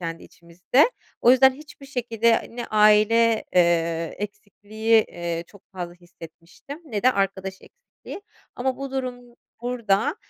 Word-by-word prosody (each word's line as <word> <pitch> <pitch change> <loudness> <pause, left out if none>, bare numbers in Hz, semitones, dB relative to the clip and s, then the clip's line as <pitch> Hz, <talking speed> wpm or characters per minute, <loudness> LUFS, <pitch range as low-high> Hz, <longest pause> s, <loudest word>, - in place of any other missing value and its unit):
kendi 165 -1 -6
içimizde. 180 - 0 0.3
O 240 - +5
yüzden 260 +1 +6
hiçbir 290 0 -14
şekilde 235 -3 0
ne 240 - -4
aile, 215 +2 +4
eee, 170 -2 +1
eksikliği, 215 +2 -1
eee, 170 -1 -5
çok 200 +1 -19
fazla 175 -2 -6
hissetmiştim 175 - -13
ne 215 -9 -4
de 255 - +4
arkadaş 195 -1 -2
eksikliği. 485 -4 -13 0.3
Ama 255 +1 -1
bu 275 0 -6
durum 250 -2 -6 0.3
burada 245 - 0
215 Hz, 130 wpm, -23 LUFS, 180-250 Hz, 0.3 s, yüzden